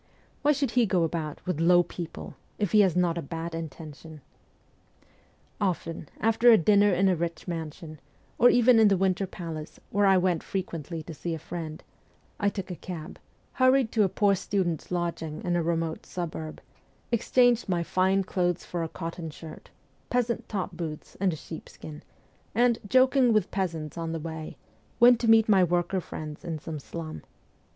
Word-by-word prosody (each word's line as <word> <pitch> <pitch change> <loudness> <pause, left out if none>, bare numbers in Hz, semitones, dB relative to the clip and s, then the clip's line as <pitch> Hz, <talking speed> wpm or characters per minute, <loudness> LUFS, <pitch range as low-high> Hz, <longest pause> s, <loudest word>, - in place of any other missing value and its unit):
' - - -35
Why 290 - +4
should 280 -2 0
he 245 -3 +3
go 180 -2 +2
about 160 -2 -3
with 180 -4 -2
"low 175 +1 +5
people," 170 -1 -7 0.2
if 205 -5 -1
he 215 - +5
has 190 -4 +4
not 175 -2 +1
a - - -3
bad 165 +3 -5
intention? 160 -1 -8 0.7
' - - -31
Often, 165 -5 -2
after 225 +2 +4
a 225 - +8
dinner 205 +3 +4
in 190 +1 +3
a 185 - +3
rich 170 +2 -4
mansion, 160 -2 -6 0.4
or 245 - +7
even 245 -1 +5
in 220 - +7
the 195 -2 +3
Winter 190 +1 +1
Palace, 165 -4 -7
where 205 0 +3
I 190 -1 +6
went 180 -3 +1
frequently 165 -4 -5
to 165 - -8
see 165 +2 -4
a - - -5
friend, 160 -1 -7 0.6
I 205 - +2
took 195 -2 -6
a - - -4
cab, 170 -1 -8 0.3
hurried 255 -2 +3
to 220 - +2
a 195 - +4
poor 200 +2 +3
student's 185 -4 -2
lodging 170 -3 -3
in 175 -1 0
a 175 - +2
remote 165 -1 -2
suburb, 160 -3 -5 0.5
exchanged 245 -1 +3
my 175 -2 +1
fine 190 +3 +2
clothes 180 -2 -1
for 175 - -4
a 165 - -3
cotton 165 0 -6
shirt, 155 +1 -11 0.4
peasant's 245 -1 0
top 195 -2 -3
boots, 160 -3 -6
and 195 -1 +2
a - - -4
sheepskin, 155 -1 -10 0.5
and, 235 0 +3
joking 255 +1 +4
with 215 -4 +1
peasants 170 -5 -3
on 165 -1 -3
the 165 - -3
way, 160 0 -7 0.4
went 240 0 +7
to 235 - 0
meet 225 -1 +6
my 195 -4 +5
worker 175 +2 0
friends 155 -2 -8
in 165 -2 -4
some 155 0 -6
slum. 155 +2 -7
175 Hz, 180 wpm, -27 LUFS, 165-205 Hz, 0.7 s, a